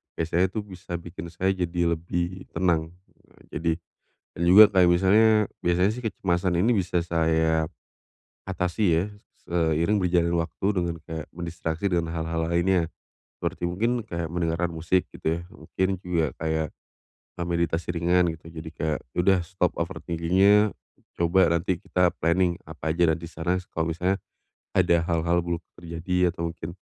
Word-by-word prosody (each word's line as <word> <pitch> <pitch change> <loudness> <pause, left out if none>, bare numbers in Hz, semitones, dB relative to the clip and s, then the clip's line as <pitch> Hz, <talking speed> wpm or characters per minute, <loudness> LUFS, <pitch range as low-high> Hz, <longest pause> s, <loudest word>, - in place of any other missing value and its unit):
Biasanya 85 +3 +1
itu 110 - -4
bisa 95 -3 -7
bikin 85 0 -8
saya 95 +3 0
jadi 85 -2 0
lebih 85 +2 -3
tenang. 85 -2 +1 0.6
Jadi 80 +2 0 0.6
dan - - -4
juga 105 +4 +10
kayak 90 -2 +5
misalnya 95 +5 +5 0.3
biasanya 90 +3 +3
sih 125 - -7
kecemasan 90 -5 0
ini 115 +7 +3
bisa 90 -2 0
saya 80 -1 +1 0.8
atasi 90 +2 -1 0.2
ya - - -3
s 105 0 -22
seiring 85 +4 +2
berjalannya 85 -1 +2
waktu 90 +4 -3
dengan 85 -2 0
kayak 80 -2 -6
mendistraksi 85 +1 -3
dengan 85 -2 +1
hal-hal 80 0 -2
lainnya. 85 0 +2 0.5
Seperti - - -4
mungkin 115 +7 0
kayak 85 -3 -3
mendengarkan 85 0 0
musik 85 +3 +1
gitu 80 +1 -1
ya - - -8
mungkin 95 +3 -2
juga 85 -4 0
kayak, 80 -1 0 0.7
eee, - - -1
meditasi 85 0 -1
ringan 90 +1 +3
gitu. - - -30
Jadi 80 -1 -7
kayak, 80 -2 -2 0.2
ya - - -9
udah 95 -1 +5
stop 90 0 0
overthinking-nya, 95 +4 +2 0.5
coba 85 +2 +4
nanti 85 +1 -1
kita 90 -1 +2
planning 85 +1 +2
apa 80 0 -3
aja 85 -1 +3
nanti 85 +1 -4
sana 85 +3 -1
kalau 80 0 -1
misalnya 90 +4 0 0.6
ada 85 -1 +4
hal-hal 85 +1 +1
buruk 85 -1 -3
terjadi 85 +1 -1
atau 85 -1 -3
mungkin 85 0 -7
85 Hz, 150 wpm, -26 LUFS, 80-90 Hz, 0.8 s, juga